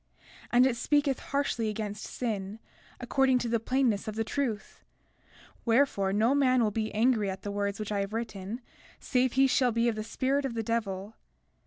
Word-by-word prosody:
33:5 -, -, -21 dB
And 245 Hz, +1 st, +6 dB
it 260 Hz, -2 st, +2 dB
speaketh 285 Hz, 0 st, +1 dB
harshly 275 Hz, -5 st, -1 dB
against 210 Hz, -1 st, -4 dB
sin, 210 Hz, -4 st, -4 dB, 0.4 s
according 260 Hz, +1 st, +2 dB
to 245 Hz, -, -2 dB
the 230 Hz, 0 st, +1 dB
plainness 235 Hz, -3 st, 0 dB
of 215 Hz, -, -4 dB
the 225 Hz, -, 0 dB
truth; 230 Hz, -3 st, -3 dB, 0.8 s
wherefore, 230 Hz, -5 st, +2 dB
no 220 Hz, +6 st, +3 dB
man 255 Hz, -3 st, +3 dB
will 215 Hz, -, +1 dB
be 220 Hz, +1 st, -2 dB
angry 220 Hz, -2 st, +2 dB
at 190 Hz, 0 st, -6 dB
the 205 Hz, -, -4 dB
words 200 Hz, 0 st, -2 dB
which 215 Hz, -1 st, -4 dB
I 205 Hz, -, 0 dB
have 195 Hz, 0 st, -2 dB
written 220 Hz, 0 st, -5 dB, 0.4 s
save 255 Hz, -1 st, +1 dB
he 270 Hz, +1 st, +5 dB
shall 255 Hz, -1 st, +3 dB
be 230 Hz, +1 st, +1 dB
of 230 Hz, -, +1 dB
the 215 Hz, -, -4 dB
spirit 270 Hz, +5 st, 0 dB
of 260 Hz, -4 st, -3 dB
the 225 Hz, -, -1 dB
devil. 210 Hz, -2 st, -3 dB
230 Hz, 190 wpm, -29 LUFS, 210-255 Hz, 0.8 s, And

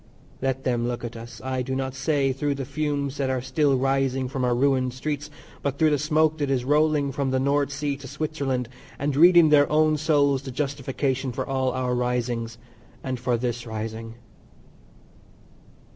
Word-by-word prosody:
Let 135 Hz, 0 st, -1 dB
them 120 Hz, -2 st, 0 dB
look 120 Hz, 0 st, -3 dB
at 120 Hz, -, -6 dB
us, 115 Hz, +1 st, -9 dB
I 130 Hz, -1 st, -2 dB
do 130 Hz, +1 st, -3 dB
not 130 Hz, -1 st, -2 dB
say 135 Hz, 0 st, +1 dB
through 140 Hz, +2 st, -1 dB
the 135 Hz, -1 st, -4 dB
fumes 145 Hz, -1 st, -2 dB
that 135 Hz, -2 st, 0 dB
are 130 Hz, -1 st, 0 dB
still 135 Hz, +2 st, +1 dB
rising 135 Hz, 0 st, +1 dB
from 130 Hz, 0 st, -3 dB
our 125 Hz, -1 st, +2 dB
ruined 130 Hz, -1 st, +1 dB
streets, 150 Hz, +2 st, -3 dB, 0.3 s
but 140 Hz, -1 st, -2 dB
through 155 Hz, 0 st, +4 dB
the 145 Hz, -, +2 dB
smoke 155 Hz, +1 st, +2 dB
that 145 Hz, -2 st, 0 dB
is 130 Hz, -2 st, 0 dB
rolling 150 Hz, 0 st, +2 dB
from 135 Hz, 0 st, -1 dB
the 130 Hz, 0 st, +1 dB
North 140 Hz, +1 st, +1 dB
Sea 140 Hz, 0 st, -2 dB
to 140 Hz, -1 st, -10 dB
Switzerland, 140 Hz, -3 st, -2 dB, 0.3 s
and 140 Hz, 0 st, -1 dB
read 175 Hz, +4 st, +7 dB
in 165 Hz, -3 st, +7 dB
their 145 Hz, -1 st, +5 dB
own 155 Hz, 0 st, +3 dB
souls 145 Hz, -3 st, +2 dB
the 135 Hz, -, -8 dB
justification 135 Hz, -1 st, -2 dB
for 130 Hz, +2 st, -3 dB
all 130 Hz, -1 st, 0 dB
our 125 Hz, -1 st, -1 dB
risings, 120 Hz, -2 st, -1 dB, 0.5 s
and 130 Hz, -2 st, -3 dB
for 125 Hz, -1 st, 0 dB
this 120 Hz, 0 st, -3 dB
rising. 110 Hz, +1 st, -5 dB
135 Hz, 185 wpm, -25 LUFS, 125-145 Hz, 0.5 s, read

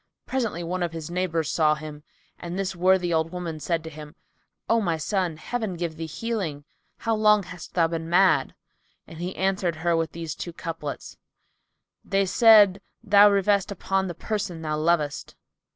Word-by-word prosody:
Presently, 230 Hz, -10 st, -2 dB
one 180 Hz, +2 st, -3 dB
of 170 Hz, -1 st, -2 dB
his 165 Hz, 0 st, -6 dB
neighbours 170 Hz, -3 st, -1 dB
saw 155 Hz, -3 st, +3 dB
him, 150 Hz, -1 st, -9 dB, 0.4 s
and 175 Hz, +1 st, -6 dB
this 195 Hz, -1 st, -2 dB
worthy 180 Hz, 0 st, +2 dB
old 160 Hz, 0 st, 0 dB
woman 175 Hz, -3 st, -5 dB
said 165 Hz, +1 st, -1 dB
to 160 Hz, -, -7 dB
him, 150 Hz, +1 st, -11 dB, 0.5 s
"O 230 Hz, 0 st, +3 dB
my 170 Hz, -5 st, 0 dB
son, 180 Hz, -1 st, -1 dB
Heaven 220 Hz, +2 st, -3 dB
give 170 Hz, -2 st, -4 dB
thee 165 Hz, 0 st, -5 dB
healing! 180 Hz, -6 st, -4 dB, 0.3 s
How 225 Hz, -, -1 dB
long 210 Hz, -1 st, +4 dB
hast 180 Hz, -2 st, -11 dB
thou 170 Hz, -2 st, +4 dB
been 165 Hz, 0 st, -4 dB
mad?" 185 Hz, +2 st, +3 dB, 0.5 s
And 160 Hz, 0 st, -12 dB
he 180 Hz, +2 st, -4 dB
answered 190 Hz, -3 st, 0 dB
her 170 Hz, +1 st, 0 dB
with 165 Hz, 0 st, -1 dB
these 165 Hz, -1 st, -5 dB
two 175 Hz, -, -7 dB
couplets,[FN#292] 165 Hz, -4 st, -10 dB
"They 195 Hz, 0 st, +2 dB
said, 205 Hz, -1 st, +6 dB, 0.2 s
Thou 205 Hz, -1 st, +7 dB
revest 200 Hz, 0 st, +2 dB
upon 195 Hz, 0 st, -1 dB
the 175 Hz, -, -5 dB
person 190 Hz, -4 st, -4 dB
thou 155 Hz, -1 st, -1 dB
lovest. 155 Hz, -2 st, 0 dB
175 Hz, 170 wpm, -25 LUFS, 160-195 Hz, 0.5 s, Thou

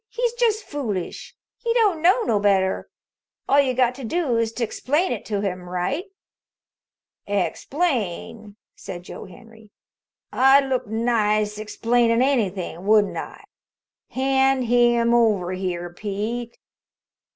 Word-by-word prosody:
He's 480 Hz, -1 st, -1 dB
just 455 Hz, -3 st, +1 dB
foolish. 225 Hz, -, -5 dB, 0.2 s
He 465 Hz, -1 st, -1 dB
don't 410 Hz, -9 st, +2 dB
know 375 Hz, +8 st, +4 dB
no 215 Hz, -, +1 dB
better. 195 Hz, -2 st, +1 dB, 0.6 s
All 280 Hz, -, +4 dB
you 260 Hz, -2 st, -1 dB
got 250 Hz, -1 st, +2 dB
to 270 Hz, +1 st, -10 dB
do 285 Hz, 0 st, -1 dB
is 230 Hz, -1 st, 0 dB
to 245 Hz, -, -3 dB
explain 295 Hz, -, 0 dB
it -, -, -4 dB
to 205 Hz, -2 st, -2 dB
him 180 Hz, -3 st, -4 dB
right." 180 Hz, -, -2 dB, 1.2 s
"Explain?" 215 Hz, -, -2 dB, 0.2 s
said 180 Hz, -2 st, -8 dB
Joe -, -, -9 dB
Henry. 220 Hz, +2 st, -16 dB, 0.6 s
"I'd 270 Hz, +2 st, +5 dB
look 255 Hz, -2 st, -1 dB
nice 215 Hz, -2 st, 0 dB
explainin' 230 Hz, +2 st, +1 dB
anything, 200 Hz, -8 st, -1 dB
wouldn't 210 Hz, -1 st, +4 dB
I? -, -, -7 dB, 0.7 s
Hand 265 Hz, 0 st, +2 dB
him 240 Hz, 0 st, +3 dB
over 210 Hz, -7 st, +2 dB
here, 175 Hz, -2 st, -4 dB
Pete." 215 Hz, +5 st, -4 dB
230 Hz, 125 wpm, -23 LUFS, 205-270 Hz, 1.2 s, I'd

